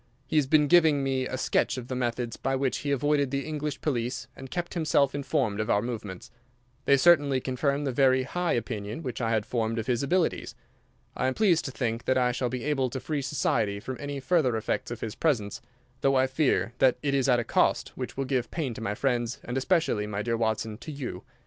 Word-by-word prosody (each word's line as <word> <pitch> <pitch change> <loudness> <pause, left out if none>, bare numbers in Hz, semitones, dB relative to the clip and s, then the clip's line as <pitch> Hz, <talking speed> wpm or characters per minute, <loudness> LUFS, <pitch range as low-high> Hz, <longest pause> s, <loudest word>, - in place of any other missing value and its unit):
He 155 - -1
has 145 -3 +3
been 150 +1 +4
giving 160 -4 +5
me 130 -1 0
a 130 - -4
sketch 130 - +1
of 125 -1 -6
the 130 - -4
methods 120 -1 -2
by 135 0 -1
which 135 -1 0
he 145 - -4
avoided 140 0 +2
the 140 +1 -2
English 150 -1 -4
police 125 -2 -2
and 135 0 -10
kept 175 +2 -4
himself 150 -5 +2
informed 130 -6 -1
of 110 - -2
our 100 - +3
movements. 105 -6 -6 0.5
They 140 - +5
certainly 145 -4 +5
confirm 140 +3 -1
the 135 - -1
very 130 0 +3
high 175 +6 -1
opinion 110 +3 -3
which 125 -2 -4
I 115 - 0
had 110 -2 +1
formed 115 -1 -1
of 115 - -2
his 120 -2 0
abilities. 170 +5 0 0.6
I - - 0
am 130 - -1
pleased 180 -7 +3
to 135 - -3
think 115 -3 -2
that 130 - +2
I 125 -1 +3
shall 125 0 -1
be 125 -1 -4
able 135 -3 0
to 130 - -4
free 150 +1 -2
society 110 -7 0
from 130 +5 -5
any 145 -1 -4
further 130 -4 +2
effects 110 - -2
of 120 -1 -6
his 110 - -4
presence, 115 -11 0 0.4
though 135 0 +2
I 130 0 +4
fear 130 -3 +1
that 130 -2 +4
it 140 -1 0
is 135 -1 +2
at 125 - +5
a 120 - 0
cost - - +1
which - - -7
will 135 - -1
give 130 -2 -1
pain 150 -7 -3
to 110 - -8
my 105 -2 -2
friends, 120 -1 0
and 125 - -5
especially, 135 - +1
my 105 0 -3
dear 115 0 0
Watson, 110 -1 -1
to 125 - -7
you. 140 -4 -6
130 Hz, 225 wpm, -27 LUFS, 120-140 Hz, 0.6 s, giving